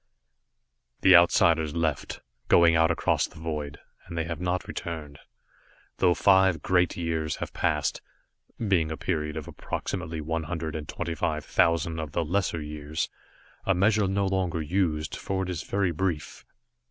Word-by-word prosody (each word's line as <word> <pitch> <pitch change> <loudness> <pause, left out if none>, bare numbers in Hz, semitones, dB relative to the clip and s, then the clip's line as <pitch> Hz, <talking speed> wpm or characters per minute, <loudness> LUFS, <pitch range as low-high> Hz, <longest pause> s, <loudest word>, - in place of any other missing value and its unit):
The 95 -1 +7
Outsiders 85 -2 +4
left, 80 -3 -2 0.3
going 85 -1 +6
out 80 0 +4
across 85 - +1
the - - -17
void, 75 -3 -4 0.3
and 85 - -7
they 80 - +1
have 80 0 -5
not 90 0 -1
returned, 75 -4 -6 0.8
though 90 -2 +3
five 95 -2 +4
Great 90 -2 +2
Years 80 -3 -1
have - - -6
passed, - - 0 0.6
being 95 -8 +1
a 80 - -4
period 75 -3 -2
of 75 - -6
approximately 80 0 -4
one 80 +1 -2
hundred 80 -2 -4
and 75 -1 -6
twenty 85 - -3
five 75 -1 -2
thousand 85 -2 +2
of 75 -2 -5
the 85 - 0
lesser 85 -2 -1
years 75 +1 -4 0.5
a 95 - +2
measure 105 +2 +3
no 100 +1 0
longer 95 -3 0
used, 80 -1 -1
for 95 0 -2
it 90 - -5
is 85 -3 -3
very 100 -1 0
brief. 85 -2 -3
85 Hz, 155 wpm, -27 LUFS, 80-90 Hz, 0.8 s, The